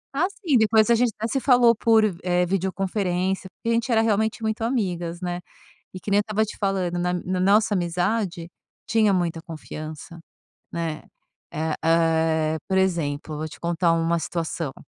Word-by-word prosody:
Ah, 330 Hz, +5 st, +2 dB
sim. 340 Hz, -, 0 dB
Depois 220 Hz, +1 st, +4 dB
a -, -, +6 dB
gente 240 Hz, 0 st, +2 dB
até 225 Hz, +2 st, -2 dB
se 270 Hz, +4 st, -1 dB
falou 245 Hz, -2 st, +5 dB
por, 220 Hz, 0 st, +4 dB, 0.2 s
eh, 180 Hz, 0 st, +2 dB
videoconferência. 190 Hz, 0 st, -1 dB
Porque 230 Hz, -, -6 dB
a -, -, +3 dB
gente 235 Hz, +2 st, 0 dB
era 225 Hz, -1 st, +4 dB
realmente 220 Hz, +1 st, 0 dB
muito 220 Hz, 0 st, -2 dB
amigas, 175 Hz, -8 st, -2 dB
né. 175 Hz, 0 st, -3 dB, 0.5 s
E 185 Hz, -, -7 dB
que 200 Hz, -, -6 dB
nem 205 Hz, -, +5 dB
eu -, -, +4 dB
estava 215 Hz, +1 st, 0 dB
te -, -, -9 dB
falando, 190 Hz, -3 st, -1 dB
na 180 Hz, 0 st, 0 dB
na 180 Hz, +1 st, -2 dB
nossa 205 Hz, +3 st, +3 dB
amizade 175 Hz, 0 st, -1 dB, 0.4 s
tinha 215 Hz, -2 st, +3 dB
muita 170 Hz, -3 st, -1 dB
confiança, 155 Hz, 0 st, -8 dB, 0.5 s
né. 165 Hz, -2 st, -3 dB, 0.5 s
É, 160 Hz, 0 st, -2 dB
eh, 160 Hz, -1 st, +2 dB
por 190 Hz, -1 st, +1 dB
exemplo, 155 Hz, -5 st, -1 dB
vou 155 Hz, +1 st, -3 dB
te 155 Hz, -, -12 dB
contar 170 Hz, 0 st, +1 dB
uma 165 Hz, +1 st, +1 dB
situação. 165 Hz, -4 st, -3 dB
185 Hz, 175 wpm, -24 LUFS, 165-220 Hz, 0.5 s, a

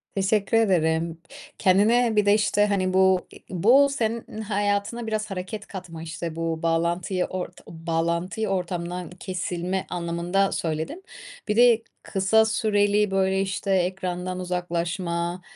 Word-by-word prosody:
Teşekkür 200 Hz, +2 st, +2 dB
ederim. 165 Hz, -5 st, +1 dB, 0.4 s
Kendine 220 Hz, +5 st, +4 dB
bir 210 Hz, -1 st, +3 dB
de, 205 Hz, -, +5 dB
işte, 205 Hz, -1 st, +3 dB
hani, 190 Hz, -3 st, 0 dB
bu 190 Hz, -1 st, +3 dB
e -, -, -11 dB
bu 240 Hz, +11 st, +5 dB
senin 230 Hz, -4 st, -3 dB
hayatına 205 Hz, +2 st, -1 dB
biraz 215 Hz, -1 st, -2 dB
hareket 195 Hz, +3 st, -5 dB
katma, 180 Hz, -4 st, -8 dB
işte, 165 Hz, 0 st, -5 dB
bu 165 Hz, -1 st, -3 dB
bağlantıyı 170 Hz, +2 st, 0 dB
ort 180 Hz, -1 st, -6 dB
bağlantıyı 170 Hz, +5 st, -2 dB
ortamdan 180 Hz, -1 st, -3 dB
kesilme 180 Hz, 0 st, -3 dB
anlamında 175 Hz, +3 st, 0 dB
söyledin. 160 Hz, -, -3 dB, 0.4 s
Bir 210 Hz, -, 0 dB
de 235 Hz, -1 st, +6 dB, 0.2 s
kısa 200 Hz, +3 st, +3 dB
süreli, 210 Hz, -2 st, +2 dB
böyle, 190 Hz, 0 st, +2 dB
işte, 195 Hz, +1 st, -2 dB
ekrandan 185 Hz, 0 st, -2 dB
uzaklaşma, 175 Hz, 0 st, -2 dB
185 Hz, 125 wpm, -25 LUFS, 170-210 Hz, 0.4 s, de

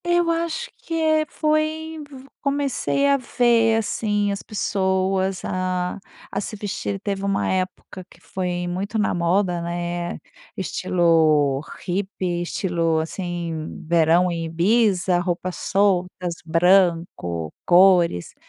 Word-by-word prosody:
Eu 345 Hz, -1 st, +2 dB
acho 335 Hz, +9 st, -2 dB
que, 330 Hz, -, -6 dB
eh, 315 Hz, -1 st, +2 dB
foi 310 Hz, 0 st, -1 dB, 0.4 s
comecei 280 Hz, 0 st, 0 dB
a 280 Hz, 0 st, +4 dB
ver, 235 Hz, -3 st, +2 dB
assim, 205 Hz, -1 st, 0 dB
as 200 Hz, -, -4 dB
pessoas 190 Hz, -2 st, -1 dB
a 185 Hz, 0 st, -2 dB, 0.3 s
a -, -, -2 dB
se 215 Hz, -, -6 dB
vestir. 200 Hz, -1 st, -4 dB
Teve 195 Hz, -1 st, -3 dB
uma 200 Hz, 0 st, 0 dB
época 185 Hz, 0 st, -3 dB
que -, -, -19 dB
foi 180 Hz, -1 st, -3 dB
muito 195 Hz, +5 st, -3 dB
na 215 Hz, -, +1 dB
moda, 175 Hz, +1 st, +1 dB
né, 175 Hz, 0 st, -3 dB, 0.4 s
estilo 160 Hz, -7 st, +2 dB, 0.2 s
hippie, 185 Hz, -2 st, -2 dB
estilo, 170 Hz, -2 st, 0 dB
assim, 165 Hz, -1 st, -4 dB
verão 170 Hz, +2 st, +3 dB
em 165 Hz, -1 st, -3 dB
Ibiza, 180 Hz, +1 st, +2 dB
roupas 175 Hz, 0 st, -2 dB
soltas, 180 Hz, -3 st, 0 dB
branco, 165 Hz, -, +2 dB
cores. 175 Hz, -, +4 dB
185 Hz, 115 wpm, -22 LUFS, 175-210 Hz, 0.4 s, a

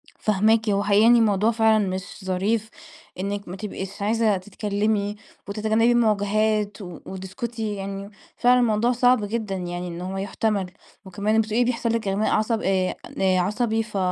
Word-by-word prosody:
فاهماكِ 220 Hz, +2 st, +2 dB
هو 200 Hz, 0 st, +1 dB
حقيقة 205 Hz, 0 st, +4 dB
يعني 235 Hz, 0 st, +6 dB
موضوع 210 Hz, +1 st, +3 dB
فعلًا 220 Hz, -2 st, +3 dB
مش 185 Hz, +1 st, -6 dB
ظريف، 205 Hz, +4 st, 0 dB, 0.5 s
إنِك 200 Hz, +1 st, -3 dB
ما 180 Hz, -, -6 dB
تبقيش 195 Hz, -1 st, -6 dB
عايزة 215 Hz, 0 st, +2 dB
تتكلمي، 205 Hz, +1 st, -1 dB, 0.3 s
وتتجنبي 220 Hz, +3 st, +2 dB
المواجهات، 215 Hz, -2 st, +1 dB
و 175 Hz, -3 st, -8 dB
وتسكتي 215 Hz, +3 st, -5 dB
يعني، 195 Hz, 0 st, -6 dB, 0.3 s
فعلًا 250 Hz, +1 st, +4 dB
الموضوع 235 Hz, 0 st, +2 dB
صعب 245 Hz, -2 st, +3 dB
جدًا 215 Hz, -2 st, -3 dB
يعني 175 Hz, -1 st, -4 dB
إن 170 Hz, 0 st, -6 dB
هو 190 Hz, +1 st, -4 dB
يُحتمل، 195 Hz, -1 st, -1 dB, 0.3 s
وكمان 205 Hz, +4 st, +1 dB
بتقولي 220 Hz, +2 st, +1 dB
بيحصل 235 Hz, -1 st, -1 dB
لِك 230 Hz, -3 st, -2 dB
إغماء 195 Hz, +3 st, 0 dB
عصب 220 Hz, +1 st, +1 dB
آآ 185 Hz, -1 st, +1 dB, 0.2 s
عصبي 210 Hz, +5 st, +1 dB
ف 215 Hz, -2 st, -6 dB
210 Hz, 150 wpm, -24 LUFS, 195-225 Hz, 0.5 s, يعني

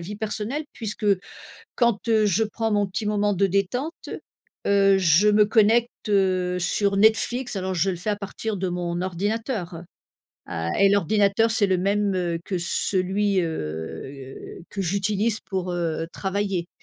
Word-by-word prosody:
vie 195 Hz, +5 st, -7 dB
personnelle 220 Hz, +7 st, -3 dB
puisque, 215 Hz, -1 st, -4 dB, 0.7 s
quand, 235 Hz, -3 st, +1 dB
heu, 220 Hz, -2 st, +3 dB
je 205 Hz, +2 st, +2 dB
prends 225 Hz, +1 st, -2 dB
mon 205 Hz, -1 st, +2 dB
petit 200 Hz, +3 st, -4 dB
moment 205 Hz, 0 st, +1 dB
de 195 Hz, +1 st, +2 dB
détente. 200 Hz, -, -2 dB, 0.6 s
Heu, 195 Hz, -1 st, +4 dB
je 180 Hz, +3 st, +4 dB
me 210 Hz, 0 st, +5 dB
connecte, 225 Hz, +2 st, +3 dB, 0.2 s
heu, 185 Hz, -2 st, +1 dB
sur 200 Hz, +3 st, +1 dB
Netflix 225 Hz, +4 st, +2 dB
alors 185 Hz, 0 st, -2 dB
je 180 Hz, +2 st, +1 dB
le 185 Hz, -, -1 dB
fais 210 Hz, +5 st, -2 dB
à -, -, 0 dB
partir 205 Hz, +2 st, -5 dB
de 185 Hz, 0 st, -2 dB
mon 175 Hz, 0 st, -3 dB
ordinateur, 200 Hz, +1 st, -2 dB
heu. 165 Hz, -, -7 dB, 0.6 s
A 85 Hz, 0 st, -3 dB
et 200 Hz, -, +5 dB
l'ordinateur 200 Hz, +3 st, +2 dB
c'est 215 Hz, -2 st, +2 dB
le 190 Hz, -1 st, +2 dB
même, 200 Hz, +2 st, +1 dB
heu, 175 Hz, -2 st, -1 dB
que 185 Hz, -, -3 dB
celui, 190 Hz, +3 st, 0 dB
heu, 130 Hz, -, -6 dB
que 200 Hz, -, -4 dB
j'utilise 200 Hz, +4 st, 0 dB
pour, 185 Hz, -2 st, -4 dB
heu, 165 Hz, -2 st, -2 dB
travailler. 195 Hz, -3 st, -2 dB
200 Hz, 155 wpm, -24 LUFS, 180-210 Hz, 0.7 s, me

